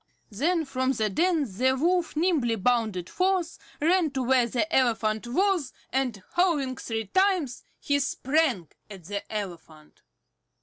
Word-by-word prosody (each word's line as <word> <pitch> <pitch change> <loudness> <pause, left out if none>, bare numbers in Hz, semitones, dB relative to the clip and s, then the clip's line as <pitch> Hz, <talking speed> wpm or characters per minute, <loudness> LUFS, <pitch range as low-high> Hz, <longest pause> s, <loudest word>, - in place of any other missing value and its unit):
Then 320 - 0
from 260 -1 0
the 215 -4 -1
den 335 - +2
the 255 +3 +1
Wolf 340 +5 +1
nimbly 305 -8 +1
bounded 220 -5 0
forth, 370 -2 0 0.2
ran 335 +1 +3
to 265 -1 -1
where 250 -1 +3
the 235 -2 0
elephant 225 -3 +1
was, 355 0 +1 0.2
and, 250 -7 -1
howling 300 -8 +1
three 225 -1 -4
times, 360 - +1 0.2
he 285 0 0
sprang 265 - 0 0.2
at 195 -4 -10
the 200 +4 -6
elephant. 170 -7 -7
260 Hz, 135 wpm, -26 LUFS, 220-325 Hz, 0.2 s, ran